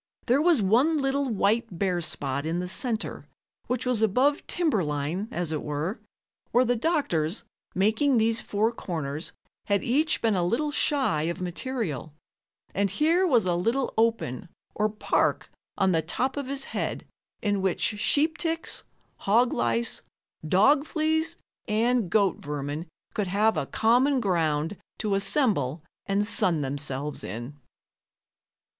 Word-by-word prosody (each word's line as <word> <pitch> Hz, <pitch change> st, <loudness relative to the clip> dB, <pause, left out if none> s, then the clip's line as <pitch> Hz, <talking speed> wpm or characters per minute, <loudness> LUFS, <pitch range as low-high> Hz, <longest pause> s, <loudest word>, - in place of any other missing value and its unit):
There 255 Hz, +3 st, +3 dB
was 320 Hz, -, +4 dB
one 255 Hz, +11 st, +3 dB
little 275 Hz, -1 st, 0 dB
white 215 Hz, -1 st, 0 dB
bare 180 Hz, -1 st, 0 dB
spot 140 Hz, -3 st, -2 dB
in 165 Hz, +2 st, -2 dB
the 180 Hz, 0 st, -2 dB
center 225 Hz, +4 st, -1 dB, 0.4 s
which 250 Hz, 0 st, -2 dB
was 250 Hz, -3 st, +1 dB
above 255 Hz, +7 st, +2 dB
timber 310 Hz, -, +1 dB
line, 150 Hz, +7 st, -2 dB
as 175 Hz, -2 st, -3 dB
it 155 Hz, -, -2 dB
were, 150 Hz, -, -3 dB, 0.5 s
where 250 Hz, +2 st, +3 dB
the 245 Hz, +1 st, +2 dB
doctors, 225 Hz, -, 0 dB, 0.3 s
making 220 Hz, +8 st, +3 dB
these 225 Hz, +1 st, +2 dB
four 215 Hz, +3 st, 0 dB
corners, 160 Hz, -8 st, -4 dB, 0.4 s
had 200 Hz, -1 st, +1 dB
each 305 Hz, +6 st, +2 dB
been 225 Hz, -2 st, +2 dB
a 180 Hz, -, +1 dB
little 250 Hz, +12 st, 0 dB
shy 260 Hz, -, +1 dB
of 170 Hz, +2 st, -4 dB
material, 180 Hz, -, -4 dB, 0.6 s
and 200 Hz, 0 st, +1 dB
here 330 Hz, -, +2 dB
was 240 Hz, -, +3 dB
a 180 Hz, -, +1 dB
little 230 Hz, +10 st, 0 dB
open, 220 Hz, -, 0 dB, 0.2 s
or 215 Hz, 0 st, +1 dB
park, 210 Hz, 0 st, 0 dB, 0.3 s
on 190 Hz, -2 st, +3 dB
the 165 Hz, -2 st, +2 dB
top 260 Hz, +9 st, -1 dB
of 285 Hz, -2 st, -4 dB
his 275 Hz, 0 st, -3 dB
head -, -, -3 dB, 0.4 s
in 205 Hz, -2 st, +1 dB
which 195 Hz, +2 st, 0 dB
sheep 310 Hz, +8 st, +2 dB
ticks, 330 Hz, -1 st, -2 dB, 0.3 s
hog 235 Hz, +5 st, +2 dB
lice, 115 Hz, 0 st, +1 dB, 0.5 s
dog 275 Hz, -, +4 dB
fleas 315 Hz, +1 st, 0 dB, 0.3 s
and 225 Hz, -1 st, +1 dB
goat 200 Hz, -1 st, +2 dB
vermin 145 Hz, +3 st, -5 dB, 0.3 s
could 205 Hz, -3 st, -1 dB
have 210 Hz, +4 st, +2 dB
a -, -, -2 dB
common 255 Hz, +5 st, +3 dB
ground 165 Hz, -4 st, 0 dB, 0.2 s
to 210 Hz, -3 st, -1 dB
assemble 195 Hz, -, +1 dB, 0.2 s
and 200 Hz, +1 st, +1 dB
sun 175 Hz, -6 st, +1 dB
themselves 140 Hz, +1 st, -3 dB
in. 120 Hz, +6 st, -6 dB
210 Hz, 145 wpm, -26 LUFS, 170-255 Hz, 0.6 s, was